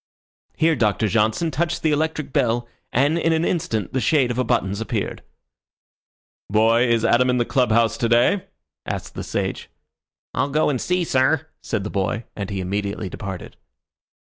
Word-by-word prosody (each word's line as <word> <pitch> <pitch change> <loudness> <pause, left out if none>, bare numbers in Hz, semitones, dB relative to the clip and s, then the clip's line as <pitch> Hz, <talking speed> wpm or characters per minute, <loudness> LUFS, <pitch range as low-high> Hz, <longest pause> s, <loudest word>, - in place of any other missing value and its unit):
Here 160 0 +3
Doctor 110 -3 +1
Johnson 110 - +1
touched 170 +5 -1
the 160 - +3
electric 155 -2 -1
bell, 120 0 +1 0.2
and 145 +6 +2
in 165 0 +2
an 160 +1 +1
instant 110 - -1
the 130 - +1
shade 125 +1 +3
of 120 - -3
a - - +3
buttons 110 -5 0
appeared. 110 -2 -3 1.3
"Boy, 115 +4 +4
is 115 -1 +2
Adam 125 +2 +4
in 125 - +2
the 120 - +1
club 125 -3 +1
house 115 0 +3
to 115 - +1
day?" 120 - +3 0.4
asked - - -5
the - - -5
sage. - - -3 0.6
"I'll 140 - 0
go 150 +1 +2
and 130 - -2
see, 180 0 0
sir," 140 +1 +2 0.2
said 110 -4 -2
the 105 - -5
boy, 100 +3 -1
and 100 -2 -4
he 100 -2 -3
immediately 100 +1 -3
departed. 95 -1 -7
120 Hz, 170 wpm, -22 LUFS, 110-150 Hz, 1.3 s, Boy